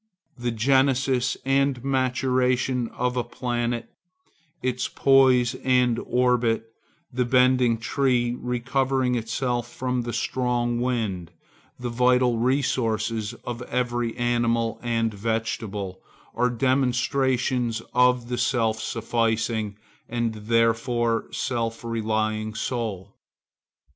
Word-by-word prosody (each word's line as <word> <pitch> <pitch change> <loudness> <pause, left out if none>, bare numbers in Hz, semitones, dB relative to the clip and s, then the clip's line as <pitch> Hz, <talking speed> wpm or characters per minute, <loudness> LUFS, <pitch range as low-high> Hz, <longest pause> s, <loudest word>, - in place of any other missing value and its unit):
The 120 -1 -3
genesis 130 +1 +2
and 135 -2 +1
maturation 130 -1 +1
of 125 +2 -2
a 125 - 0
planet, 120 -1 -3 0.7
its 125 0 -1
poise 130 -3 +4
and 125 -2 +3
orbit, 120 -2 +1 0.4
the 125 0 +1
bended 125 -2 +3
tree 120 0 +1
recovering 130 +1 0
itself 120 +1 -2
from 125 0 -2
the 120 0 -4
strong 120 -1 -1
wind, 110 -9 -2 0.5
the 125 -1 -4
vital 125 0 +3
resources 115 -4 0
of 120 0 -5
every 120 -1 -1
animal 120 -1 0
and 115 -2 0
vegetable, 105 -3 -3 0.3
are 125 - +1
demonstrations 125 -1 +1
of 125 -1 +3
the 125 -1 -3
self 110 -2 +1
sufficing 115 -2 -1 0.3
and 120 -1 -1
therefore 115 +1 +1
self 115 -3 -2
relying 110 -1 -1
soul. 110 -6 -4
120 Hz, 100 wpm, -25 LUFS, 115-125 Hz, 0.7 s, poise